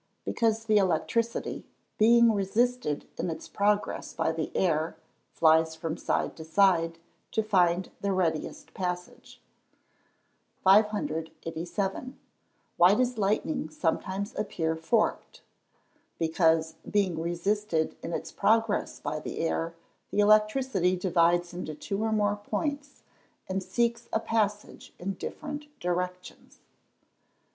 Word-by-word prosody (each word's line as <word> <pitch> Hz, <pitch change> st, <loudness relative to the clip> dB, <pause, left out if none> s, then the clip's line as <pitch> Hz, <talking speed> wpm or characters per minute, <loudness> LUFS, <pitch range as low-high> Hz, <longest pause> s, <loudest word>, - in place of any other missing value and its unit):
_ -, -, -45 dB, 0.2 s
Because 225 Hz, -1 st, 0 dB
the 215 Hz, -1 st, +4 dB
electricity, 205 Hz, +6 st, 0 dB, 0.4 s
being 235 Hz, +1 st, +6 dB
resisted 205 Hz, -4 st, 0 dB
in -, -, -1 dB
its 160 Hz, -, -6 dB
progress 205 Hz, +1 st, 0 dB
by 160 Hz, 0 st, +1 dB
the 160 Hz, -1 st, -3 dB
air, 160 Hz, -2 st, +1 dB, 0.3 s
flies 160 Hz, 0 st, +4 dB
from 160 Hz, 0 st, -3 dB
side -, -, -1 dB
to 160 Hz, -, -7 dB
side, 165 Hz, -1 st, +3 dB, 0.4 s
to 220 Hz, -, +1 dB
find 180 Hz, -3 st, +2 dB
the 200 Hz, -, 0 dB
readiest 170 Hz, -5 st, -2 dB
passage. 180 Hz, -1 st, -5 dB, 1.2 s
587. 190 Hz, -, 0 dB, 0.6 s
Why 180 Hz, +3 st, +6 dB
does 250 Hz, -1 st, 0 dB
lightning 195 Hz, -6 st, 0 dB
sometimes 190 Hz, +7 st, -2 dB
appear 165 Hz, -6 st, -1 dB
forked? 190 Hz, +8 st, -1 dB, 0.7 s
Because, 160 Hz, -1 st, +2 dB
being 190 Hz, -6 st, +1 dB
resisted 175 Hz, 0 st, -1 dB
in -, -, -5 dB
its -, -, -4 dB
progress 225 Hz, -1 st, +1 dB
by 155 Hz, +1 st, -3 dB
the -, -, -6 dB
air, 165 Hz, 0 st, -1 dB, 0.3 s
the -, -, -2 dB
electricity 215 Hz, -2 st, +3 dB
divides 175 Hz, -1 st, +2 dB
into 170 Hz, -3 st, -5 dB
two 195 Hz, +6 st, -4 dB
or 220 Hz, -, 0 dB
more 205 Hz, -1 st, +1 dB
points, 285 Hz, +7 st, -4 dB, 0.4 s
and 190 Hz, 0 st, -2 dB
seeks 235 Hz, +5 st, -1 dB
a -, -, +1 dB
passage 210 Hz, -2 st, -2 dB
in 195 Hz, +3 st, -3 dB
different 295 Hz, -, -6 dB
directions. 180 Hz, +1 st, -4 dB
190 Hz, 115 wpm, -28 LUFS, 165-215 Hz, 1.2 s, being